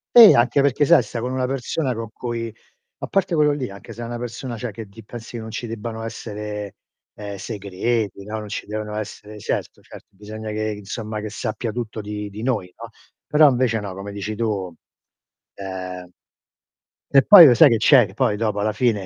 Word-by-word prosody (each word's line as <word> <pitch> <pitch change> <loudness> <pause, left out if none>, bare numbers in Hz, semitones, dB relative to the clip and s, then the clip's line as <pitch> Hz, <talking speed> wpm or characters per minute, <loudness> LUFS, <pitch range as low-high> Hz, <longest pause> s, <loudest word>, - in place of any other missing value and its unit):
Eh, 230 -3 +11
anche 125 +4 +3
perché 140 +1 +2
sai 165 -4 +6
sta 115 +1 -6
con 125 +1 -3
una 130 -1 -1
persona 135 0 -2
con 115 -1 -6
cui 115 -2 -5 0.5
a - - -5
parte 190 -2 0
quello 150 -2 +4
lì 130 -7 -3
anche 100 - -11
se 120 - -7
è - - -4
una 120 0 -5
persona 120 +1 -5
cioè 125 +2 -4
che 110 +1 -8
di 110 +2 -14
pensi 115 +2 -10
che - - -5
non 110 - -8
ci 120 +2 -5
debbano 115 0 -6
essere, 105 -2 -6 0.4
ehm, 100 -1 -7
segreti, 100 +1 -3
no, 110 +2 -5
non 105 - -6
ci 105 - -5
devono 105 0 -5
essere 105 0 -7
certo, - - -4
certo - - -14
bisogna 110 +2 -8
che 110 0 -2
insomma 110 +1 -5
che 105 0 -6
sappia 110 +2 -3
tutto 115 -2 -5
di 105 0 -5
di 105 +3 -8
noi, 105 -8 -1
no, - - -9 0.4
però 150 -1 +6
invece 125 -3 +1
no, 100 -2 -6
come 100 +1 -7
dici 100 +1 -5
tu, 100 -5 -2 0.8
ehm 90 -2 -7 1.0
Che 135 - +7
poi 195 -5 +11
lo 125 - +7
sai 150 +3 +8
che, 115 - +3
c'è, 125 0 +6
che 95 - -14
poi 105 -1 +1
dopo 105 -2 -1
alla 105 +1 +1
fine 110 -6 0
110 Hz, 205 wpm, -22 LUFS, 105-120 Hz, 1.0 s, Eh